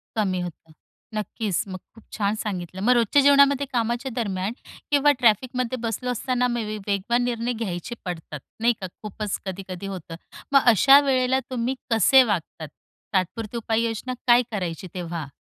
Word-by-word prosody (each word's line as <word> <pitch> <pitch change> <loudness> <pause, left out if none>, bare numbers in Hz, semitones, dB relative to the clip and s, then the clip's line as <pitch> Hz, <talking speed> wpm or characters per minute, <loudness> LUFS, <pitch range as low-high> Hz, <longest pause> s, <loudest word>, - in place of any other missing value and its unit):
कमी 195 -4 0
होतं, 165 -2 -8 0.4
नक्कीच. 210 -3 -2
मग 185 - -6 0.2
खूप 225 - -16
छान 205 0 +1
सांगितलं. 185 -2 -5
मग 250 +4 +4
रोजच्या 240 +4 +4
जेवणामध्ये 280 0 +5
कामाच्या 240 +2 -1
दरम्यान 200 -3 -2 0.4
किंवा 290 0 +5
ट्रॅफिकमध्ये 250 +2 +1
बसलो 240 +2 -2
असताना 250 +1 0
मे 240 -1 -2
बी 215 0 -4
वेगवान 205 +5 +1
निर्णय 240 0 -1
घ्यायचे 220 -1 -4
पडतात, 160 -4 -6 0.2
नाही 235 +2 +3
का. 185 - -3 0.2
खूपच 210 -1 -4
कधी-कधी 190 0 -6
होतं. 180 -4 -7 0.4
मग 275 -1 +6
अशा 275 +7 +8
वेळेला 260 -1 +2
तुम्ही 250 +1 -1 0.2
कसे 255 +5 +6
वागतात? 170 -7 -3 0.5
तात्पुरती 205 +5 -1
उपाययोजना 230 +2 -1
काय 240 0 +7
करायची 180 -4 -4
तेव्हा? 170 -4 -5
225 Hz, 150 wpm, -24 LUFS, 190-250 Hz, 0.5 s, अशा